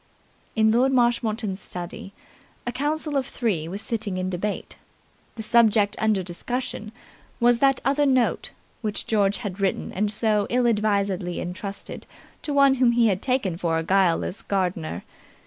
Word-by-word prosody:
In 220 -1 +4
Lord 250 +4 +3
Marshmoreton's 230 -5 +1
study 180 +2 -7 0.5
a 245 - -1
council 295 +3 -2
of 270 -2 0
three 195 -10 -1
was 195 +5 -5
sitting 215 -5 -3
in 185 0 -2
debate. 200 +3 -3 0.6
The 220 - -6
subject 220 -3 +4
under 215 -3 +2
discussion 215 +4 -4 0.5
was 240 0 +4
that 270 -1 +3
other 285 +2 +3
note 255 -3 +1 0.3
which 210 -3 -3
George 205 -2 +2
had 205 -4 -6
written 195 -1 -1
and 205 +2 0
so 210 -1 +1
ill 250 0 +2
advisedly 200 -5 0
entrusted 195 +3 -6 0.3
to 300 - -4
one 280 -1 +5
whom 240 -2 +5
he 235 -1 +4
had 190 0 -1
taken 250 -10 0
for 165 -2 0
a 165 - -1
guileless 185 +1 +1
gardener. 180 -5 -2
215 Hz, 150 wpm, -24 LUFS, 190-240 Hz, 0.6 s, one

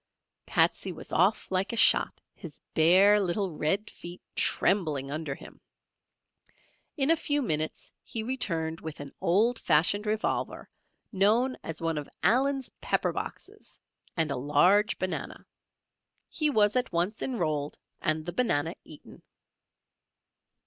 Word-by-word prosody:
Patsey - - +2
was - - -7
off - - +1
like 190 +1 0
a - - -4
shot; - - +5
his - - -11
bare 185 +6 +5
little 190 -2 -2
red 195 +9 0
feet 175 +1 -9 0.2
trembling 155 -8 +1
under 150 -2 -4
him. - - -14 1.4
In 280 +2 +4
a - - +5
few 290 -3 -1
minutes 155 -7 -2
he 225 - -4
returned 170 -10 -2
with 160 -1 -8
an 145 -1 -9
old 225 +7 +2
fashioned 190 +8 +2
revolver 215 +1 -2 0.4
known 225 +6 +2
as 165 0 -6
one 165 -2 -1
of 145 - -9
"Allen's 270 +3 +2
pepper - - 0
boxes" - - -8 0.4
and 160 -3 +1
a - - -1
large 175 - +3
banana. 185 0 -5 0.8
He 305 -2 0
was 215 -5 +3
at 250 0 0
once 180 +5 -1
enrolled 155 - -2 0.2
and 155 0 -1
the 175 - -5
banana 165 -8 0
eaten. 155 - -14
185 Hz, 130 wpm, -28 LUFS, 155-220 Hz, 1.4 s, shot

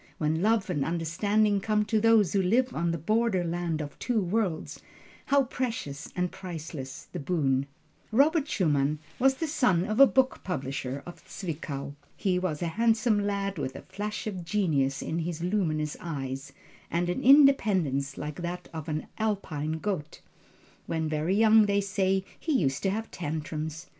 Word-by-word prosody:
When 160 +1 0
love 215 0 +2
and 145 -5 0
understanding 200 +6 +1
come 210 0 +1
to 215 0 +1
those 225 -5 +4
who 200 - +3
live 245 +7 +2
on 170 +2 0
the 170 - 0
border 215 +3 +1
land 170 -2 -2
of 145 -1 -8
two 245 -3 0
worlds, 190 -3 -1 0.5
how 280 0 +4
precious 230 - -4
and 180 -1 0
priceless 160 -7 -7
the 180 - -5
boon! 140 -4 0 0.4
Robert 290 +5 +3
Schumann 150 - +1 0.2
was 265 +1 +4
the 325 - -2
son 245 - +2
of 215 +3 -2
a 275 - +10
book 265 0 +1
publisher 140 -5 -3
of 175 - -10
Zwickau. 145 -6 -5 0.2
He 185 -2 +1
was 175 -4 -2
a 170 +5 -4
handsome 225 -1 +3
lad 200 -3 -2
with 130 -2 -3
the - - -9
flash 210 +1 -5
of 190 -5 -4
genius 155 -8 0
in 165 - -2
his 165 0 -3
luminous 160 -6 0
eyes, 135 -4 -5 0.4
and 175 +1 0
an 180 - -1
independence 200 - +4
like 150 +2 -5
that 175 +1 -5
of 160 0 -6
an 155 0 -2
Alpine 175 -8 -1
goat. 160 -2 -3 0.7
When 160 -1 -1
very 155 +5 0
young 220 0 +6
they 200 0 +2
say 190 -1 0
he 320 - -1
used 140 - +1
to 195 - +1
have 220 +3 -3
tantrums. 155 0 -4
180 Hz, 165 wpm, -28 LUFS, 155-215 Hz, 0.7 s, a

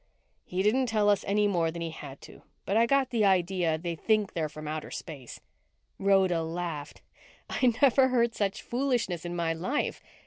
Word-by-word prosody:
"He 185 +1 -2
didn't 250 +5 +2
tell 215 -2 +2
us 205 -1 +2
any 205 +1 +2
more 170 -5 +1
than 170 +1 -5
he 165 - -4
had 140 -3 -10
to, - - -13 0.2
but 200 - -1
I 230 +1 +4
got 275 0 +2
the 230 -3 +1
idea 180 -4 +2
they 170 +1 -4
think 215 +4 +1
they're 160 -2 -2
from 155 0 -9
outer 155 0 -4
space." 140 -8 -8 0.6
Rhoda 190 -3 +3
laughed. 160 -3 -5 0.4
"I 255 -2 +2
never 265 0 +6
heard 235 -2 +2
such 200 -3 -2
foolishness 240 -10 -1
in 175 0 -4
my 165 -1 0
life." 185 - -2
190 Hz, 180 wpm, -28 LUFS, 165-225 Hz, 0.6 s, never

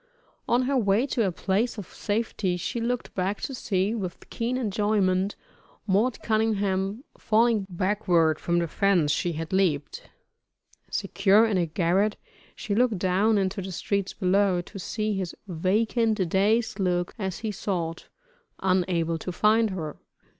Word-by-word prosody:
On 245 +2 +3
her 275 +2 0
way 210 +1 +2
to 235 -6 0
a - - 0
place 205 +7 -1
of 205 - -5
safety 205 -4 -1
she 230 +6 -3
looked 245 +1 -2
back 190 +2 -1
to 270 - -4
see, 200 -4 0
with 190 -6 -6
keen 240 +2 -1
enjoyment, 205 -4 +1 0.5
"Mort 215 +5 +1
Cunningham" 205 -1 0 0.2
falling 220 -2 +2
backward 180 -4 +1
from 170 0 0
the 170 -1 +1
fence 180 -4 +2
she 175 +2 0
had 160 +3 -5
leaped. 165 -7 0 0.8
Secure 205 +3 +3
in 210 -4 +1
a 170 - +1
garret, 185 +5 +1 0.4
she 205 - -3
looked 230 -1 +2
down 195 +4 +2
into 195 +1 -1
the 190 0 -6
streets 195 +2 -2
below, 190 -1 +2
to 195 +3 -10
see 215 +3 -2
his 190 -3 -3
vacant, 210 +3 +1
dazed 215 +3 +1
look 175 -2 0
as 190 -3 -3
he 215 - 0
sought, 175 -4 -3 0.5
unable 175 -3 +1
to 180 - -4
find 215 +4 +3
her. 160 -6 -5
195 Hz, 145 wpm, -26 LUFS, 180-220 Hz, 0.8 s, On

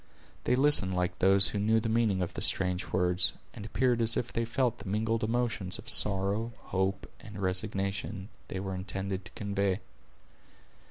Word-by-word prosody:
They - - +2
listened 130 -9 +3
like 90 0 -2
those 95 +1 +6
who 105 - -3
knew 110 +2 +2
the 115 - -3
meaning 110 -5 +1
of 85 - -5
the - - -6
strange 90 -1 +3
words, 90 0 0 0.2
and - - -9
appeared 120 +2 0
as 115 0 +3
if 120 - -3
they 115 - -1
felt 120 0 -1
the - - -8
mingled 110 +2 -1
emotions 115 -4 -1
of - - -13
sorrow, 100 +3 +3
hope, 95 +1 -3
and 105 -4 -10
resignation, 100 +1 -3 0.2
they 95 - -5
were 95 0 -4
intended 95 0 -5
to - - -12
convey. 100 -2 -1
100 Hz, 170 wpm, -29 LUFS, 95-115 Hz, 0.2 s, those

